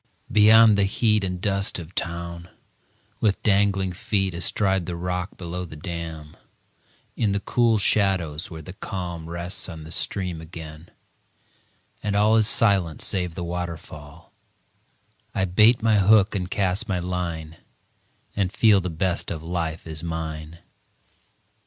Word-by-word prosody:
Beyond 110 Hz, 0 st, +7 dB
the 100 Hz, -, +4 dB
heat 105 Hz, +1 st, +2 dB
And 90 Hz, -1 st, -2 dB
dust 100 Hz, +1 st, 0 dB
of 85 Hz, 0 st, -9 dB
town, 85 Hz, 0 st, -4 dB, 0.7 s
with 105 Hz, -3 st, +1 dB
dangling 95 Hz, -2 st, +2 dB
feet 95 Hz, 0 st, -1 dB
Astride 95 Hz, +1 st, 0 dB
the 90 Hz, -, -3 dB
rock 90 Hz, +2 st, -4 dB
below 90 Hz, 0 st, -5 dB
the 80 Hz, -3 st, -9 dB
dam, 80 Hz, -2 st, -6 dB, 0.8 s
In 105 Hz, -3 st, +1 dB
the 100 Hz, -, 0 dB
cool 115 Hz, +1 st, +2 dB
shadows 95 Hz, -7 st, +1 dB
where 80 Hz, -2 st, -8 dB
the 95 Hz, -, -9 dB
calm 85 Hz, -4 st, -6 dB
Rests 85 Hz, +3 st, -3 dB
on 80 Hz, -3 st, -8 dB
the 80 Hz, -, -10 dB
stream 90 Hz, -1 st, -1 dB
again, 80 Hz, 0 st, -10 dB, 1.1 s
and 105 Hz, -1 st, -1 dB
all 105 Hz, +2 st, +4 dB
Is 110 Hz, -2 st, +4 dB
silent 95 Hz, -9 st, +2 dB
save 90 Hz, -3 st, -2 dB
the 90 Hz, -, -4 dB
waterfall, 85 Hz, -3 st, -7 dB, 1.0 s
I 95 Hz, -, +2 dB
bait 110 Hz, +6 st, +4 dB
my 110 Hz, -2 st, +4 dB
hook 100 Hz, +1 st, +5 dB
and 90 Hz, -3 st, -2 dB
cast 95 Hz, +1 st, 0 dB
my 95 Hz, -, +1 dB
line, 85 Hz, -3 st, -4 dB, 0.8 s
And 95 Hz, -3 st, 0 dB
feel 105 Hz, -2 st, +4 dB
the 90 Hz, -, -3 dB
best 85 Hz, +2 st, -1 dB
of 80 Hz, -1 st, -5 dB
life 85 Hz, -1 st, -3 dB
is 80 Hz, -1 st, -6 dB
mine. 80 Hz, -1 st, -5 dB
90 Hz, 140 wpm, -24 LUFS, 85-100 Hz, 1.1 s, Beyond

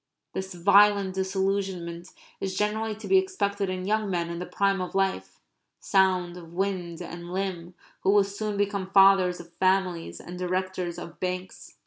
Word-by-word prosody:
(This 190 Hz, -1 st, -5 dB
violent 200 Hz, +1 st, +5 dB
disillusionment 190 Hz, -2 st, -2 dB, 0.3 s
is 190 Hz, -1 st, -3 dB
generally 215 Hz, +1 st, 0 dB
to 220 Hz, -, -9 dB
be 385 Hz, -, +6 dB
expected 200 Hz, -, -1 dB
in 185 Hz, 0 st, -3 dB
young 215 Hz, 0 st, 0 dB
men 170 Hz, -2 st, -1 dB
in 170 Hz, -, -5 dB
the 180 Hz, -, -5 dB
prime 195 Hz, -1 st, +1 dB
of 180 Hz, -, -5 dB
life, 195 Hz, 0 st, -1 dB, 0.4 s
sound 185 Hz, -3 st, +2 dB
of 170 Hz, -1 st, -12 dB
wind 180 Hz, -3 st, -2 dB
and 170 Hz, +1 st, -8 dB
limb, 180 Hz, -2 st, -3 dB, 0.2 s
who -, -, 0 dB
will 205 Hz, 0 st, +6 dB
soon 200 Hz, +1 st, -4 dB
become 200 Hz, -2 st, -1 dB
fathers 195 Hz, -2 st, +5 dB
of 170 Hz, 0 st, -12 dB
families 185 Hz, -, +1 dB
and 180 Hz, +1 st, -9 dB
directors 185 Hz, -1 st, -2 dB
of 170 Hz, -1 st, -9 dB
banks.) 185 Hz, 0 st, -5 dB
190 Hz, 160 wpm, -27 LUFS, 180-200 Hz, 0.4 s, be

